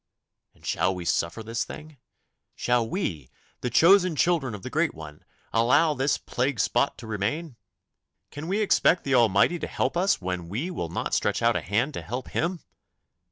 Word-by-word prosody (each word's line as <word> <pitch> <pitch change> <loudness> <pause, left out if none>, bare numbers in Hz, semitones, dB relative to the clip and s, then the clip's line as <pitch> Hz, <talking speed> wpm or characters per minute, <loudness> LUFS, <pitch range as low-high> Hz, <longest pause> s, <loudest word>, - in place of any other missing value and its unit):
And - - -19
shall 95 0 0
we 90 -1 -6
suffer 85 +7 -1
this 115 +1 -2
thing? 155 -1 -10 0.6
Shall 120 -2 +1
we, 85 - -3 0.3
the 125 - -2
chosen 180 +3 +5
children 150 -8 +1
of 100 - -11
the - - -6
Great - - 0
One, 75 -1 -11 0.3
allow 125 +8 +4
this 135 +1 +1
plague 125 -1 -2
spot 120 +6 +1
to 120 - -10
remain? 120 +8 -3 0.8
Can 145 +2 -7
we 200 +4 0
expect 185 -3 +3
the 135 - -1
Almighty 120 - +4
to - - -4
help 130 - -1
us 185 +3 +2
when 90 -2 -4
we 135 - -3
will 85 - -4
not - - -3
stretch - - 0
out - - +3
a - - 0
hand 115 - 0
to - - -5
help 120 +10 -5
Him? 170 +1 -2
125 Hz, 180 wpm, -26 LUFS, 100-160 Hz, 0.8 s, chosen